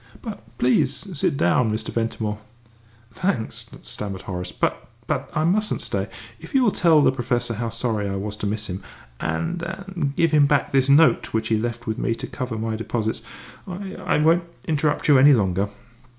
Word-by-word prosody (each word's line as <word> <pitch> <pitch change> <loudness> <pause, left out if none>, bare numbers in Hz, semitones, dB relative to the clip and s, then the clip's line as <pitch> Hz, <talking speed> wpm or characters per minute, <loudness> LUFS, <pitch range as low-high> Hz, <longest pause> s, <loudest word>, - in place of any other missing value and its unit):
But, 225 -5 -6 0.2
please 130 +7 +1
sit 140 -2 0
down, 110 +5 +3
Mr. 110 - -3
Ventimore." 110 -2 -2 0.7
"Thanks," 125 - -2 0.2
stammered 100 -3 -5
Horace, 90 -2 -4
"but - - -1 0.2
but - - -2
I 155 - +2
mustn't 210 +6 +1
stay. - - -1 0.3
If - - -10
you 265 - +5
will 220 - +4
tell 160 -5 +4
the - - +5
Professor 120 -2 -1
how 115 +1 -2
sorry 115 -3 -1
I 100 - -2
was 105 +2 -3
to 105 - -2
miss 105 +1 -2
him, 95 0 -5 0.4
and 80 - -2
and 180 -5 -4
give 165 0 +3
him 150 -2 +5
back 145 0 +2
this 135 0 +3
note 155 +3 +5
which 110 0 0
he 110 - +3
left 120 +1 -3
with 110 -2 -2
me 115 - 0
to - - -5
cover 125 -3 -4
any 110 -1 -1
deposit, 110 -1 -2 0.5
I 190 +1 -6
I - - 0
won't 165 +3 +4 0.2
interrupt 150 -1 0
you 145 -3 +7
any 145 +2 +8
longer." 100 -3 +1
125 Hz, 185 wpm, -23 LUFS, 110-155 Hz, 0.7 s, any